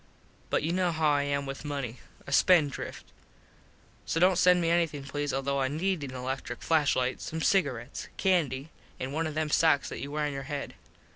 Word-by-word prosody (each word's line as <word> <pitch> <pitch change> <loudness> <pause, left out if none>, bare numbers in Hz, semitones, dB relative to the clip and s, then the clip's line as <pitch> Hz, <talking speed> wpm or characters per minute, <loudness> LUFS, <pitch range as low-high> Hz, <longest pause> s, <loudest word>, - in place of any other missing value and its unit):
But - - +1
you 165 +2 0
know 180 -1 +1
how 160 -1 +2
I 145 -1 +2
am 140 0 -1
with 135 0 -6
money. 140 -5 -4 0.3
A - - -8
spend 155 -1 +5
drift. - - -7 1.0
So 165 - 0
dont 185 +2 +5
send 180 0 +6
me 165 -1 +1
anything 165 -5 +1
please 145 +1 -3
although 135 +1 -1
I 130 - +2
need 165 +3 -1
an 130 -2 -6
electric 130 -1 -4
flash 155 -3 +3
light, 130 0 -1
some 160 - -4
cigarets, 140 - 0
candy 160 -6 +1 0.3
an 130 +1 -4
one 160 +2 -1
of 155 - -6
them 155 -1 -1
sox 160 -4 +3
that - - -6
you 140 - -5
wear 150 +1 -1
on 145 - -2
your 135 - -4
head. 145 -1 -4
145 Hz, 205 wpm, -29 LUFS, 135-165 Hz, 1.0 s, send